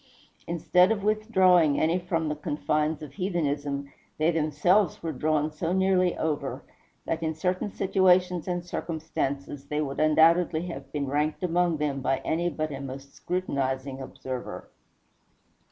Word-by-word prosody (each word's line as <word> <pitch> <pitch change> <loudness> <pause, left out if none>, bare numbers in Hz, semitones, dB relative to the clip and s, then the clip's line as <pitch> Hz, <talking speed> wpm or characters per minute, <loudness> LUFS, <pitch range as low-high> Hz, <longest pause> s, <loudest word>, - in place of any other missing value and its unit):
Instead 180 +3 +3
of 210 -3 -1
withdrawing 190 -8 +4
any 165 +3 +2
from 165 -3 -1
the 150 - -1
confines 150 +1 -1
of 150 - -9
heathenism, 145 -7 -2 0.2
they 155 +2 +3
themselves 165 +5 +2
were 165 - -2
drawn 155 +2 0
so 165 +3 -2
nearly 190 -1 +2
over, 155 -2 -2 0.4
that 165 0 -2
in 160 -1 -1
certain 185 +5 -1
situations 180 -3 +2
and 175 -1 -2
circumstances 145 -5 -4
they 150 +1 -2
would 140 -2 -3
undoubtedly 160 +2 +4
have 175 - -7
been 145 -2 -2
ranked 150 +5 -1
among 175 -1 +1
them 145 -2 -1
by 135 0 +1
any 170 +2 0
but 155 -2 -3
a 140 -1 -5
most 135 +1 -8
scrutinizing 135 -6 -2
observer. 130 -1 -7
160 Hz, 140 wpm, -27 LUFS, 145-180 Hz, 0.4 s, withdrawing